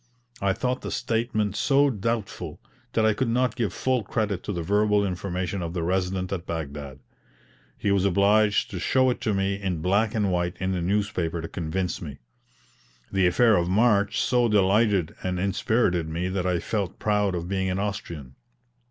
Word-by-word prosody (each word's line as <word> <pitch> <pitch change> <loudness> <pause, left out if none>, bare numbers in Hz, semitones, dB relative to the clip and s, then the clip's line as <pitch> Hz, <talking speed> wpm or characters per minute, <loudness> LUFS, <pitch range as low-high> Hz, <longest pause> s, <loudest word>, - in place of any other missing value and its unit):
I 100 -1 +2
thought 125 +4 -2
the - - -5
statement 110 -3 -1
so 140 +3 +3
doubtful, 115 -1 -3 0.3
that 110 - +2
I 110 - +4
could 130 +4 -1
not 125 +2 +1
give 115 -7 -1
full 130 +6 0
credit 105 -3 -2
to - - -4
the 85 -4 -3
verbal 105 +2 +2
information 90 0 -3
of 85 -1 -4
the 85 - -1
Resident 95 +1 -1
at 90 -2 -5
Baghdad; 70 -4 -5 0.8
he 100 - 0
was 100 -2 +2
obliged 100 +2 +3
to 95 - -4
show 130 +6 +3
it - - -5
to 110 -3 0
me 95 +1 -1
in 90 -5 -2
black 105 +5 +2
and 105 -3 +1
white 90 +1 -1
in 95 0 -1
the 90 -2 -1
newspaper 90 -3 -1
to 80 - -5
convince 90 +3 -3
me. 70 -5 -7 0.9
The 95 -2 +3
affair 110 +5 +4
of 85 -1 +1
March 105 0 +3
so 125 -2 +2
delighted 100 -3 +3
and 90 -1 -2
inspirited 95 -3 +1
me 85 +3 -2
that 95 -1 -1
I 90 -1 +1
felt 100 0 -3
proud 105 -3 +1
of 85 0 -4
being 95 0 -1
an 90 - -1
Austrian. 85 -9 -4
95 Hz, 180 wpm, -25 LUFS, 90-105 Hz, 0.9 s, I